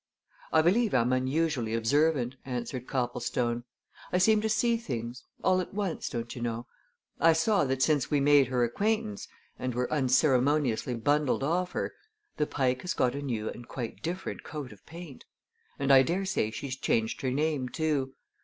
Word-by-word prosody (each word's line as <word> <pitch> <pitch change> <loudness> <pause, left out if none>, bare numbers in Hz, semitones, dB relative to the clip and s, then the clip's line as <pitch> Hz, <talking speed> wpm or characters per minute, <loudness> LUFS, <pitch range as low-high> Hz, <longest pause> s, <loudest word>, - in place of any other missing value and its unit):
"I 160 - +4
believe 210 +6 +3
I'm 125 +2 +3
unusually 130 -3 0
observant," 130 +2 +2
answered 125 0 -4
Copplestone. 120 -1 -1 0.5
"I - - +2
seem 210 +3 +4
to 220 - 0
see 235 +2 +2
things 125 - -5 0.2
all 185 0 +3
at 185 - -8
once, 200 -5 -2
don't 120 -2 -5
you 120 - -7
know. 120 0 -3 0.5
I 165 0 +6
saw 165 +1 +2
that 130 0 0
since 150 -5 +2
we 145 - +2
made 140 -1 +5
her 125 -1 +1
acquaintance 120 - -1 0.3
and 130 -2 -3
were 125 +3 -1
unceremoniously 130 -2 +2
bundled 145 +3 +1
off 180 +5 0
her - - -2 0.4
the 150 - +1
Pike 130 -2 0
has 180 - -3
got 125 - +2
a 140 - -4
new 115 -6 -2
and 120 - -11
quite 120 -4 -6
different 180 +3 -4
coat 145 -6 -6
of 100 - -20
paint. 165 -4 -10 0.5
And 140 0 +3
I 135 - +9
daresay 180 - 0
she's 130 +4 -5
changed 115 -3 0
her 130 - 0
name, 140 -1 0
too. 145 -4 -1
135 Hz, 170 wpm, -29 LUFS, 120-160 Hz, 0.5 s, I